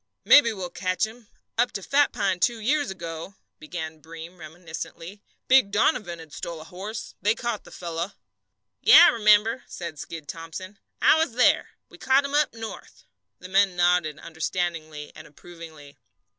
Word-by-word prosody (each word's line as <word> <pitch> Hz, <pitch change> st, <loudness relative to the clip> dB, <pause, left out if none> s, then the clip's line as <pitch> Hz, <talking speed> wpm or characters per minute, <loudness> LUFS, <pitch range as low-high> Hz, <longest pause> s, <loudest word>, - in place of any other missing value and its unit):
"Maybe 260 Hz, -6 st, +7 dB
we'll 185 Hz, -4 st, -6 dB
catch 185 Hz, 0 st, -1 dB
him. 225 Hz, 0 st, -13 dB, 0.3 s
Up 240 Hz, -, +3 dB
to 195 Hz, -, -5 dB
Fat 285 Hz, +6 st, +2 dB
Pine 195 Hz, -5 st, -1 dB
two 235 Hz, +3 st, +1 dB
years 285 Hz, +6 st, 0 dB
ago," 170 Hz, 0 st, -7 dB, 0.2 s
began 160 Hz, 0 st, -7 dB
Breem, 165 Hz, +3 st, -11 dB
reminiscently, 165 Hz, +4 st, -9 dB, 0.3 s
"Big 260 Hz, -5 st, +5 dB
Donovan 205 Hz, -, +1 dB
had 160 Hz, -2 st, -12 dB
a 165 Hz, -2 st, -5 dB
horse 195 Hz, +6 st, -7 dB
stole. -, -, -13 dB
They 210 Hz, +4 st, +2 dB
caught 235 Hz, -3 st, -4 dB
the -, -, -14 dB
fellow." 170 Hz, +2 st, -5 dB, 0.7 s
"Yes, 310 Hz, -, +9 dB
I 345 Hz, -, +9 dB
remember," 215 Hz, +2 st, +3 dB
said 170 Hz, -4 st, -7 dB
Skid 160 Hz, -2 st, -8 dB
Thomson. 170 Hz, +5 st, -8 dB, 0.2 s
"I 315 Hz, -, +6 dB
was 320 Hz, -7 st, 0 dB
there. 250 Hz, +2 st, +3 dB
We -, -, -17 dB
caught 270 Hz, +2 st, +3 dB
him 280 Hz, -, -5 dB
up 295 Hz, 0 st, +2 dB
north." 225 Hz, -, -9 dB, 0.3 s
The 180 Hz, -, -11 dB
men 195 Hz, -1 st, +3 dB
nodded 175 Hz, -3 st, +2 dB
understandingly 160 Hz, -2 st, -4 dB
and 155 Hz, -, -12 dB
approvingly. 155 Hz, -2 st, -13 dB
185 Hz, 160 wpm, -25 LUFS, 165-225 Hz, 0.7 s, Yes